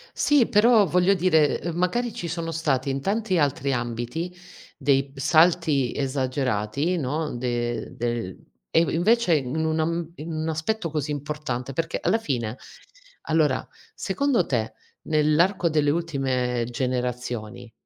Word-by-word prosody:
Sì, 290 -5 +3
però 220 0 +5
voglio 180 +2 +3
dire, 160 -5 +3
uhm, 170 -1 -3
magari 210 +7 0
ci 170 - -5
sono 165 0 -3
stati 145 -4 0
in 135 0 -3
tanti 200 +1 0
altri 140 -2 +1
ambiti 120 +8 -3 0.5
dei 135 -1 +1
salti 155 -2 +3
esagerati, 130 - -1
no, 150 0 -2
de 120 -2 -3
del 120 -6 -3 0.3
e - - +4
inv 170 - +1
invece 210 +3 +3
in 145 +3 -1
un 160 0 0
am 165 +1 -1
in 160 +3 -6
un 160 0 -2
aspetto 165 +3 -2
così 150 -1 -2
importante, 145 -3 -4
perché 165 +4 -2
alla 225 - +1
fine 125 - -3 0.6
allora, 155 -4 +1 0.3
secondo 240 -1 0
te 115 -4 -1 0.3
nell'arco 165 +4 +2
delle 150 -2 +2
ultime 130 -7 -1
generazioni 125 -2 -3
150 Hz, 135 wpm, -24 LUFS, 130-170 Hz, 0.6 s, però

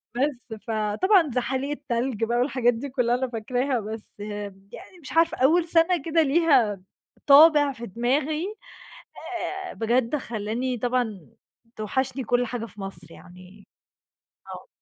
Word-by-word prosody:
بس، 255 -3 -2
فطبعًا 230 - +2
زحاليق 260 +3 -1
التلج 250 -5 -2
بقى 235 +1 0
والحاجات 245 -1 +2
دي 240 +5 -6
كُلّها 245 -2 +1
أنا 260 +1 -1
فاكراها، 245 +3 -1
بس 215 0 -8
يعني 205 - -8
مش 270 - -9
عارفه 330 +1 +3
أول 320 +7 +3
سَنة 335 0 +3
كده 330 0 +2
ليها 275 - +3 0.5
طابع 290 0 +7
في 235 -2 -8
دماغي 275 - -1 1.2
آآ، - - -8
بجد 235 +3 0
خلّاني 240 0 -3
طبعًا 240 -4 -1 0.5
توحشني 260 +5 -2
كل 245 +1 +1
حاجة 240 -1 -4
في 210 -2 -12
مصر 185 -4 -8
يعني 185 +4 -15 0.9
آه. - - -12
245 Hz, 130 wpm, -25 LUFS, 220-280 Hz, 1.2 s, طابع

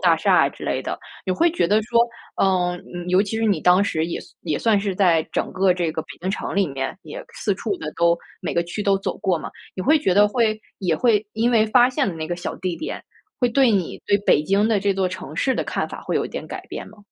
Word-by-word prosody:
大 - - +4
厦 - - +2
啊 - - +2
之 - - -10
类 - - -1
的。 - - -4 0.3
你 185 - +1
会 335 - +3
觉 325 - +1
得 210 +5 +3
说， 235 +2 +1 0.4
嗯， 180 -2 +2 0.2
嗯， 175 0 -6
尤 185 +2 +4
其 215 +2 -4
是 225 - 0
你 200 -7 +2
当 180 +4 +5
时 160 -5 0
也 170 - -3
算 - - -16
也 155 -4 -1
算 220 -3 +3
是 200 -2 -2
在 175 -4 +3
整 - - -1
个 185 -1 +3
这 175 -3 -1
个 160 - -2
北 155 - -28
京 185 +2 -2
城 195 - -4
里 200 - +3
面 135 -1 -4
也 - - -8
四 - - -1
处 400 - -3
的 330 - -6
都 170 0 +3 0.2
每 - - -3
个 170 - +2
区 175 +5 -5
都 200 -1 +3
走 195 - -3
过 185 -2 +1
嘛。 - - -7 0.2
你 185 - -4
会 310 +9 +4
觉 190 -11 +1
得 205 +2 +6
会 220 -1 +1 0.2
也 180 -4 +1
会 220 -2 +2
因 230 +2 +1
为 220 -2 +4
发 245 +3 +5
现 250 - 0
了 180 - -4
那 160 -1 -4
个 175 - -2
小 175 - -5
地 185 -2 -3
点， 315 - -5 0.4
会 245 - +2
对 255 +1 +4
你 195 -5 -1
对 200 - +4
北 170 -7 +3
京 195 +6 +2
的 215 -3 +2
这 200 0 +1
座 190 -1 +1
城 180 -4 -8
市 260 +9 +1
的 - - -1
看 - - -2
法 - - -8
会 - - -3
有 - - 0
一 - - -5
点 - - -6
改 - - -7
变 - - -7
吗？ 215 - -17
195 Hz, 295 characters per minute, -22 LUFS, 175-220 Hz, 0.4 s, 得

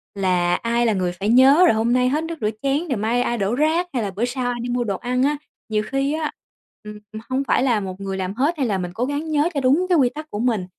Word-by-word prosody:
là 180 -2 +1
ai 235 +3 0
là 225 - +2
người 180 -2 -1
phải 195 +4 -3
nhớ 270 +7 +6
rồi 340 - +5
hôm 230 +2 +1
nay 250 0 +3
hết 300 +4 0
nước 335 +1 -4
rửa 210 - +1
chén 280 +5 0
rồi 260 - 0
mai 225 +4 0
ai 240 - -1
đổ 200 +3 0
rác, 320 +5 +1
hay 240 - -1
là 200 - -3
bữa 210 +5 -1
sau 250 +1 -3
ai 240 - -4
đi 245 - -4
mua 245 0 0
đồ 200 -4 -2
ăn 250 +1 -1
á. 290 +1 +1 0.3
Nhiều 215 -1 0
khi 275 +2 0
á, 310 -1 -2 0.5
ừm, 210 0 -9 0.3
hông 265 +2 0
phải 260 - +1
là 240 -5 +2
một 190 -1 -6
người 195 -1 -4
làm 185 0 -3
hết 285 +9 0
hay 265 -4 0
là 200 - 0
mình 180 -1 -4
cố 240 +5 -1
gắng 290 +3 -3
nhớ 300 +3 +2
cho 280 - -1
đúng 280 +8 +3
cái 355 - +4
quy 260 -4 +4
tắc 305 +4 -9
của 205 - -4
mình, 225 -5 0
245 Hz, 290 wpm, -21 LUFS, 210-280 Hz, 0.5 s, nhớ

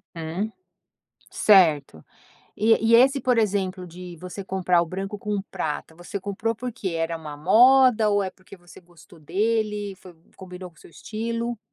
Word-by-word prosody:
Uhum, 170 +6 -4 0.8
certo. 155 - +3 0.5
E 225 +2 +4
e - - +8
esse, 270 +3 +4
por 250 -2 +1
exemplo, 190 -4 -1
de 175 0 -10
você 180 +4 -8
comprar 185 -2 +1
o - - -1
branco 195 +4 -5
com 205 0 -3
prata, 160 -3 -4
você 175 +4 -7
comprou 205 +4 -3
porque 235 -6 -5
era 165 0 -2
uma 155 -2 -8
moda 230 - +5
ou 205 0 +2
é 190 - -3
porque 185 +1 -16
você 175 -1 -16
gostou 170 -1 -19
dele, 210 +3 -1
foi 185 -2 -15 0.2
combinou 180 -1 -10
com 170 - -29
o - - -19
seu - - -16
estilo? 230 +4 -4
190 Hz, 165 wpm, -24 LUFS, 175-220 Hz, 0.8 s, e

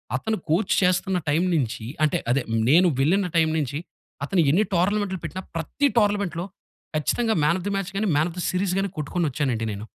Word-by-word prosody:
అతను 220 - -1
కోచ్ 175 +7 +2
చేస్తున్న 180 0 +2
టైం 155 +4 +2
నుంచి 120 -6 -2 0.2
అంటే, 155 - +2
అదే 135 +3 +2 0.3
నేను 175 +5 +6
వెళ్ళిన 180 +7 +2
టైం 160 -1 +4
నుంచి, 145 -2 -2 0.5
అతను 175 +4 +2
ఎన్ని 190 +8 +3
టోర్నమెంట్లు 190 +1 +1
పెట్టిన 185 - -5
ప్రతి 165 - 0
టోర్నమెంట్‌లో 200 -5 +1 0.5
కచ్చితంగా 220 +9 +1
మ్యాన్ 160 +4 +3
ఆఫ్ 180 - -9
ద 205 - -1
మాచ్ 195 -1 -3
గాని, 215 - 0
మ్యాన్ 155 +4 +2
ఆఫ్ 175 - -13
ద - - -2
సీరీస్ 185 0 0
గాని 195 0 -1
కొట్టుకొని 160 +3 -1
వచ్చానండి 125 -5 -1
నేను. 100 +2 -7
175 Hz, 185 wpm, -24 LUFS, 150-195 Hz, 0.5 s, నేను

